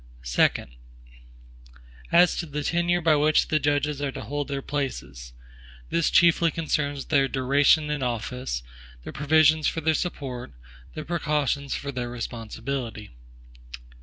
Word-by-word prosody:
Second. - - +1 1.4
As 175 +1 +5
to 170 - -3
the 150 0 -4
tenure 175 +2 +1
by 160 -2 +4
which 150 +1 +3
the 155 - +2
judges 145 0 0
are 140 -1 -1
to - - -6
hold 145 0 -3
their 140 -1 -4
places; 70 - -4 0.6
this 170 -1 +2
chiefly 170 0 +4
concerns 145 -3 -2
their 140 -3 +2
duration 140 +3 +3
in 150 -2 -2
office; 120 - -3 0.4
the - - -8
provisions 155 +1 +4
for 165 - -1
their 160 +1 +2
support; 135 - -4 0.4
the 155 - -6
precautions 150 -4 -1
for 140 - -4
their 125 -2 -4
responsibility. 115 -1 -5
145 Hz, 135 wpm, -25 LUFS, 125-155 Hz, 1.4 s, As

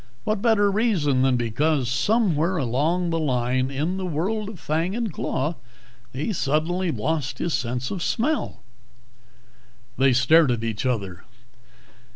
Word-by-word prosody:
What 215 -2 -1
better 205 -3 +3
reason 190 - +1
than 130 -1 +3
because 125 +4 0
somewhere 180 - +1
along 160 +7 0
the 165 - 0
line 130 -3 0
in 150 +7 -2
the 190 - -3
world 200 +7 -2
of 205 -6 -10
fang 165 +6 -1
and 230 -6 -2
claw 150 +4 -2 0.5
he 150 - -3
suddenly 170 +4 0
lost 145 +2 -2
his 170 - -2
sense 125 +1 -2
of 190 - -4
smell?" 285 - -1 1.4
They 135 0 +5
stared 135 +5 +5
at 120 -2 -1
each 115 +2 -2
other. 100 -8 -3
155 Hz, 140 wpm, -24 LUFS, 130-185 Hz, 1.4 s, They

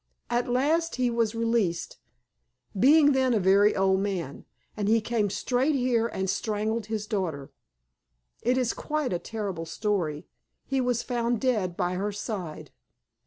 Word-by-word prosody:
At 240 +1 0
last 310 +7 +1
he 250 -1 +1
was 230 -1 0
released, 230 -7 0 0.8
being 290 +7 +6
then 260 -3 +2
a - - +3
very 200 +2 +4
old 190 0 +2
man, 185 -8 -3 0.3
and 205 -2 -2
he 225 +2 +4
came 215 -2 0
straight 250 +8 0
here 245 -3 +1
and 190 -4 -3
strangled 215 +2 -1
his 220 -2 -3
daughter. 175 -11 -3 0.9
It 250 +2 +1
is 250 -2 +1
quite 300 -7 -2
a 175 - -1
terrible 195 -7 -5
story. 165 -4 -2 0.4
He 270 -1 0
was 245 -2 0
found 240 -2 -1
dead 210 -9 0
by 180 -1 0
her 200 +3 -2
side. 200 -6 -6
220 Hz, 150 wpm, -27 LUFS, 190-245 Hz, 0.9 s, being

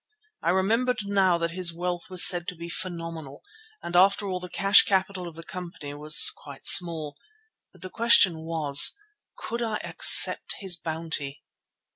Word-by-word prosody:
I - - -3
remembered 215 +5 -1
now 195 -3 0
that 170 0 -4
his 180 0 -1
wealth 175 +3 -7
was 185 -1 +5
said 175 -1 0
to 180 - -7
be 170 +1 -11
phenomenal 165 -5 -8 0.4
and 175 - -7
after 200 +3 +2
all 185 -1 -5
the 180 0 -11
cash 195 +2 +3
capital 190 -2 -3
of 165 - -12
the 165 - -12
company 170 -5 -10
was 150 +1 +4
quite 140 -1 -15
small. 160 -4 +3 0.6
But - - -20
the 185 - -8
question 215 -7 +2
was—could 165 - -2
I 225 -2 -4
accept - - +3
his 190 -3 +1
bounty? 160 -4 -4
175 Hz, 155 wpm, -24 LUFS, 165-195 Hz, 0.6 s, was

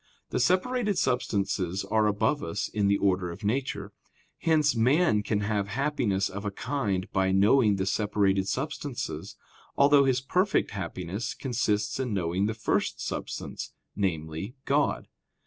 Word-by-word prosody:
The - - 0
separated 200 - +1
substances 100 -6 0
are 110 +1 +2
above 105 +8 +1
us 95 +5 -2
in 105 -2 0
the 100 0 +3
order 95 -3 +1
of 85 +6 -9
nature; 125 +6 -2 0.5
hence 155 -4 +3
man 125 +1 +3
can 105 0 -1
have 105 -1 -1
happiness 110 -5 0
of 100 +2 -6
a 105 - -1
kind 100 -4 -2
by 95 0 +2
knowing 105 +3 +4
the 95 -1 -1
separated 100 -1 +1
substances, 140 0 -4 0.4
although 140 0 +6
his 130 -1 +2
perfect 185 +10 +1
happiness 95 +1 -4
consists 110 -4 -1
in 125 -5 -1
knowing 90 +2 0
the 110 - -2
first 110 - 0
substance, - - -5 0.2
namely, 85 - -2
God. 145 +1 +1
105 Hz, 140 wpm, -28 LUFS, 95-135 Hz, 0.5 s, although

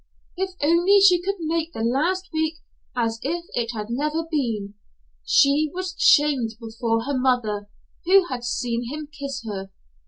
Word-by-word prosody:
If 375 0 -3
only 345 +6 +5
she 365 -3 +6
could 395 +2 -1
make 325 +1 -2
the 225 - -4
last 335 +11 0
week 315 0 0 0.4
as 230 -2 -1
if 340 +5 -3
it 235 -2 -1
had 215 +1 -5
never 300 +6 -1
been! 225 -9 -2 0.5
She 280 - +4
was 370 0 -3
shamed 295 - +4
before 225 0 -2
her 280 +3 -2
mother, 235 -6 0 0.4
who 380 +1 +6
had 255 -7 -5
seen 240 -1 -2
him 305 +2 -5
kiss 275 -3 -5
her. 195 -3 -5
280 Hz, 155 wpm, -23 LUFS, 230-335 Hz, 0.5 s, she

